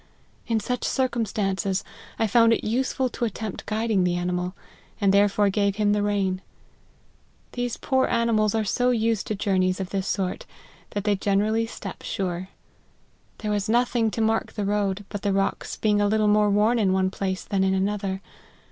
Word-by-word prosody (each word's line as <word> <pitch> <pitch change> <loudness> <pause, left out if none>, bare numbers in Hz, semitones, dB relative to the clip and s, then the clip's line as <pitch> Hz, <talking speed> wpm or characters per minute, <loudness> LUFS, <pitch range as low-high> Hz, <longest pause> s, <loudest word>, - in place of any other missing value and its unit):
In 225 -1 +1
such 250 +3 -3
circumstances, 210 -6 0 0.3
I 225 - +2
found 230 +2 +5
it - - -1
useless 255 +2 0
to 240 - -2
attempt 220 -1 -5
guiding 215 -2 +1
the 175 -1 +1
animal, 180 +1 -2 0.4
and 200 -2 +3
therefore 200 0 +4
gave 200 0 +1
him 205 -1 +2
the 210 - +1
rein. 195 -2 0 1.1
These 245 -1 -3
poor 260 -2 +1
animals 225 -3 +2
are 220 - +1
so 245 +4 +1
used 225 -3 +1
to 215 - -1
jpurneys 185 -2 +1
of 190 -1 -4
this 195 -1 -2
sort, 185 -2 -2 0.5
that 205 - -1
they 205 -1 +2
generally 210 +3 +1
step 195 -3 -8
sure. 185 -1 -3 0.9
There 210 -1 -3
was 205 0 -1
nothing 235 -1 +2
to 225 - -3
mark 225 0 0
the 205 - -2
road, 200 -1 -1
but 205 - -5
the 200 -2 0
rocks 195 0 -1
being 210 -1 +2
a 205 - +3
little 215 0 +2
more 210 0 +4
worn 215 +4 +3
in 195 -3 +2
one 190 0 +1
place 190 -1 -3
than 195 -1 0
in 190 0 +2
another. 195 0 -1
205 Hz, 175 wpm, -25 LUFS, 195-225 Hz, 1.1 s, found